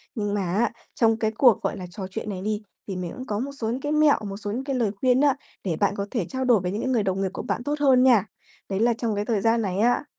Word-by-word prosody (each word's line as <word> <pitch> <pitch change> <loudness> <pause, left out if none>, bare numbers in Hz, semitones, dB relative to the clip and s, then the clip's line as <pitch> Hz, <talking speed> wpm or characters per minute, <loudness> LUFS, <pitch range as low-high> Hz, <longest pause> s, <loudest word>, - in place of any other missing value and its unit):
Nhưng 205 -3 -2
mà 205 - 0
á, 225 +2 +2 0.2
trong 225 -1 +3
cái 220 -1 0
cuộc, 235 -1 +4
gọi - - -2
là, 185 - -6
trò 195 -2 -6
chuyện 220 0 -5
này 185 -2 -4
đi, 210 +1 -2 0.3
thì 195 - -4
mình 180 -2 -4
cũng 255 - -7
có 210 -5 -2
một 270 +4 -3
số 240 -6 -4
những 250 +3 -2
cái 290 - -2
mẹo, 305 -1 +4
một 195 - -6
số 205 -1 -5
những 245 +5 -3
cái 275 -1 -2
lời 230 -5 +1
khuyên 255 0 +4
á 285 -2 +4 0.3
để 175 -4 -1
bạn 200 0 +2
có 200 0 -2
thể 225 -8 -1
trao 260 0 -2
đổi 240 -5 +5
với 180 0 -3
những 210 +3 -3
cái 260 - -1
người 235 -5 +2
đồng 190 0 -1
nghiệp 190 - 0
của - - -4
bạn - - -3
tốt 290 +3 -1
hơn 260 -3 +5
nha. 235 -7 +5 0.4
Đấy 195 0 -1
là 235 +1 +3
trong 225 -2 -2
cái 205 +1 -2
thời 215 -4 0
gian 230 +1 +3
này 195 -1 -2
á, 245 +5 +3
225 Hz, 310 wpm, -25 LUFS, 200-255 Hz, 0.4 s, đổi